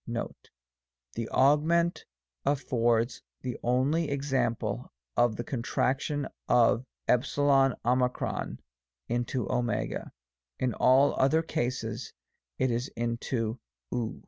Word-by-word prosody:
Note. - - -5 0.6
The 115 -1 -4
augment 160 +5 +3 0.4
affords 120 -4 +1 0.2
the 125 -2 -4
only 135 +7 +1
example 130 - -1 0.2
of 120 -2 +3
the 120 - -4
contraction 135 +3 -1 0.2
of 120 +1 +4 0.2
€0 130 -1 +2 0.5
into 120 0 -1
w; 120 - -1 0.6
in 130 -2 0
all 135 +5 +5
other 155 +5 +4
cases 120 -5 -3 0.4
it 130 - +1
is 120 +3 -1
into 115 0 -2 0.3
ov. 115 -2 -2
125 Hz, 90 wpm, -29 LUFS, 120-135 Hz, 0.6 s, all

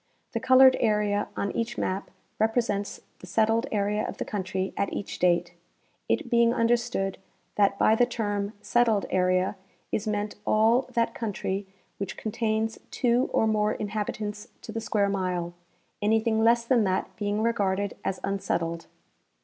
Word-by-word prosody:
The 230 - -2
colored 260 +1 +7
area 210 -2 +1
on 200 - -1
each 235 +1 -3
ma,p 190 +2 -2 0.3
represents 220 -2 0 0.2
the 185 - -11
settled 225 +5 +2
area 210 0 0
of - - -5
the - - -3
country 190 -1 -3
at 200 - -1
each 200 - -5
date, 175 -1 +2 0.6
it - - +1
being 235 0 +3
understood 230 -4 0 0.3
that 200 -1 +2
by 215 - +4
the 240 +2 +3
term 205 -3 -2
" - - -32
settled 230 -4 +3
area 185 +1 +1 0.2
" - - -39
is 215 +1 -1
meant 210 0 -2
all 225 +5 +3
that 230 -1 +1
country 200 -3 -3 0.3
which 195 -1 -4
contains 220 0 -1
two 245 +1 +1
or - - +2
more 215 -1 +2
inhabitants 210 0 -4 0.2
to - - -7
the 225 - -4
square 210 -2 +1
mile, 180 -3 -2 0.5
anything 220 +1 +2
less 235 +1 +4
than 235 -2 +3
that 185 0 -1
being 205 +1 -1
regarded 200 -3 0
as 190 - -2
unsettled. 170 -4 -2
210 Hz, 155 wpm, -27 LUFS, 195-230 Hz, 0.6 s, colored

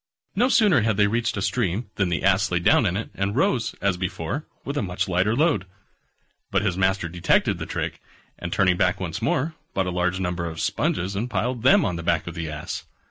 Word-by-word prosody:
No 245 +6 +3
sooner 205 - +5
had 110 -2 +1
they 105 - +5
reached 115 +2 0
a 100 - -1
stream 100 +2 -1
than 95 -3 0
the 85 - -1
Ass 95 0 +3
lay 90 - +1
down 90 +5 +4
in 90 +1 0
it, 110 - -5
and 100 +2 -2
rose, 130 -2 +1
as 100 -2 +2
before, 95 - -3 0.2
with 140 - -3
a 145 - 0
much 90 -3 -2
lighter 95 +4 +1
load. 135 - +2 0.8
But - - +1
his 95 -5 0
master 95 -1 +1
detected 85 0 +1
the - - -5
trick, - - -4 0.4
and 85 - -5
turning 90 -2 +3
back 90 +1 +2
once 90 0 -4
more, 130 +7 0 0.2
bought 95 - +1
a 90 - -2
large 90 +1 0
number 90 -2 -2
of 80 -1 -5
sponges, 90 +2 -1
and 115 +5 -2
piled 125 0 -1
them 130 - +5
on 90 -4 -1
the - - -4
back 85 -1 +1
of 85 - -6
the 80 -2 -4
Ass. 75 0 -5
95 Hz, 225 wpm, -24 LUFS, 90-115 Hz, 0.8 s, sooner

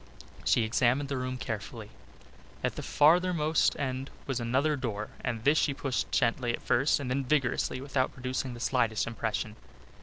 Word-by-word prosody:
She 115 - +3
examined 125 +5 +2
the 140 - -1
room 130 0 -3
carefully. 110 -1 -6 0.7
At - - 0
the - - -4
farthermost 160 0 +3
end 130 -1 -2 0.2
was 135 -2 -2
another 130 +6 +1
door 110 -6 -4
and 115 -3 -2
this 145 +4 +4
she 140 - +1
pushed 135 -2 -2
gently 120 -1 +1
at - - -4
first 135 +6 +3
and 140 - -4
then 135 +2 0
vigorously 130 -2 0
without 135 -1 0
producing 130 0 -3
the - - -9
slightest 120 -4 +1
impression. 110 -2 -3
130 Hz, 160 wpm, -29 LUFS, 115-140 Hz, 0.7 s, this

